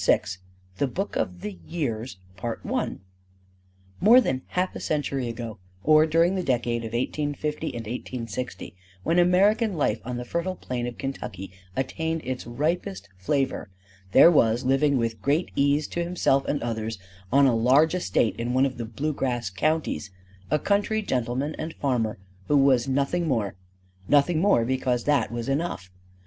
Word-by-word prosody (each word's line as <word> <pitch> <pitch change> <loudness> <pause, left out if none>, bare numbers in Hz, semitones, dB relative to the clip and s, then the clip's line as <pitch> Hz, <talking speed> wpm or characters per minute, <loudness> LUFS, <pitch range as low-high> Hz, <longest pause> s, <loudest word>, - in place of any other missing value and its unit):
IV 95 0 +2 0.4
THE 140 - +2
BOOK 195 +10 -4
OF 90 -1 -2
THE 100 -4 -6
YEARS 125 - -3 0.2
MORE 95 - -1
than 130 - 0
half 185 +1 -1
a - - -4
century 140 -4 -1
ago, 115 -2 -6 0.2
or 155 +1 +6
during 165 +3 +3
the 190 - 0
decade 120 -6 0
of 115 0 -6
1850 150 +5 -2
and 120 -5 -5
1860, 120 -1 -5 0.3
when 170 +2 +2
American 200 +4 +3
life 130 -8 0
on 125 +1 -4
the 125 - -5
fertile 170 +7 -2
plain 120 -6 -4
of 120 - -6
Kentucky 95 -9 -5 0.2
attained 160 +5 -2
its 130 -2 -4
ripest 120 - -2
flavor, 135 +5 -1 0.4
there 170 - +8
was 120 -4 +3
living 135 +2 +3
with 115 -2 -2
great 150 +6 +1
ease 145 +2 +2
to 170 - -2
himself 170 -6 +1
and 145 - -1
others 110 -2 -3 0.3
on 140 +1 +6
a 130 - +4
large 135 +8 +4
estate 175 -10 +1
in 120 +2 -2
one 130 +1 +4
of 130 -3 -4
the 115 - -3
bluegrass 120 -3 -2
counties 150 0 -1 0.4
a - - +3
country 205 +5 +1
gentleman 130 - -1
and 160 +1 -5
farmer 120 -6 0 0.3
who 145 - +4
was 135 -3 +4
nothing 140 +6 0
more: 110 -9 0 0.5
nothing 150 +3 +3
more 190 - +4
because 125 -1 0
that 145 -4 +2
was 120 0 -4
enough. 135 - -2
130 Hz, 155 wpm, -26 LUFS, 115-155 Hz, 0.5 s, there